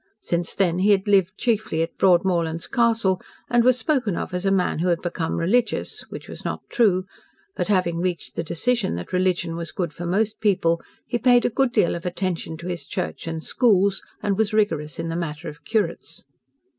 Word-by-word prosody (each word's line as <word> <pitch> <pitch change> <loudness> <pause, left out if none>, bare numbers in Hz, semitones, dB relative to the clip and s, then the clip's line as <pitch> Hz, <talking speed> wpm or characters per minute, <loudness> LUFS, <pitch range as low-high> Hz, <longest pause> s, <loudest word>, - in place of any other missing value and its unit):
Since 170 0 -2
then 180 -2 +2
he 195 +3 +3
had 200 0 +3
lived 195 -2 +3
chiefly 215 -8 0
at 165 - -6
Broadmorlands 170 -3 +2
Castle, 230 -6 +2 0.3
and 240 -1 +4
was 255 0 +4
spoken 250 - 0
of - - -4
as 180 +2 -1
a - - +3
man 185 -4 +1
who 175 - 0
had 170 -2 +2
become 170 -2 -2
religious, 220 +9 0
which - - -8
was - - -9
not - - -4
true, 190 -6 +3 0.5
but, - - -1
having 180 -4 +1
reached 180 -1 -2
the - - -2
decision 205 - 0
that 85 - -7
religion 180 -2 +1
was 165 -1 -5
good 170 -4 -3
for 175 +2 -5
most 215 +4 0
people, 170 -5 +2 0.2
he 240 - -2
paid 245 0 +5
a - - +2
good 265 +2 +2
deal 210 -7 +2
of 170 - -5
attention 180 -2 -3
to 170 +2 -8
his 175 -2 -5
church 180 -2 -4
and 160 -1 -4
schools, 200 -5 +2 0.2
and 205 -1 0
was 220 -1 +1
rigorous 155 -9 0
in - - -3
the 165 - -3
matter 160 -3 -4
of 150 +1 -9
curates. 205 -7 -2
185 Hz, 200 wpm, -23 LUFS, 170-215 Hz, 0.5 s, paid